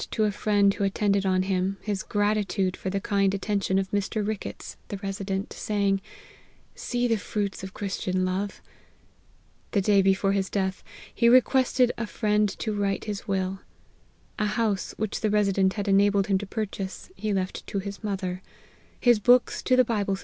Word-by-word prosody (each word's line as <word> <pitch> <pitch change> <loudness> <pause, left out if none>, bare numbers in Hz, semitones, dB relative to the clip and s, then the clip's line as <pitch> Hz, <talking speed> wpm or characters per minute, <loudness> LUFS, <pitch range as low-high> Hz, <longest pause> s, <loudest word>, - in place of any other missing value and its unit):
to 220 - 0
a 210 - +2
friend 205 -1 +2
who 200 - -3
attended 200 0 +1
on 185 0 +2
him, 190 0 -1
his 205 -3 -3
gratitude 205 -3 0
for 190 - -4
the 195 +1 -1
kind 195 -1 +1
attention 200 -1 0
of 190 0 -1
Mr. 205 +1 -1
Ricketts, 215 -2 -5
the 200 - -5
Resident, 195 0 -4
saying, 200 -2 0 0.4
' - - -29 0.3
See 245 0 -1
the 225 -2 +2
fruits 200 -1 -3
of 190 - -8
Christian 185 -2 -1
love 190 +2 -3 0.5
!' - - -35
The 200 - +3
day 200 0 +4
before 195 0 +2
his 195 -1 0
death, 190 -1 -2 0.3
he 235 - +4
requested 255 0 +4
his 230 -3 -3
friend 210 -1 +1
to 220 - -2
write 200 -1 -1
his 210 0 -5
will. 190 -1 -1 0.8
A 210 - +1
house 210 -2 -1
which 215 -1 -2
the 215 - +1
Resident 195 -2 +2
had 205 -1 -4
enabled 200 0 +4
him 195 -2 +2
to 205 - -6
purchase, 205 - -5
he 215 - -2
left 190 -2 -2
to - - -3
his 200 +2 -5
mother; 190 -3 -3 0.6
his 240 -3 +4
books 245 +3 +4
to 255 - +3
the 255 0 +5
Bible. 200 -4 0
200 Hz, 180 wpm, -26 LUFS, 195-210 Hz, 0.8 s, the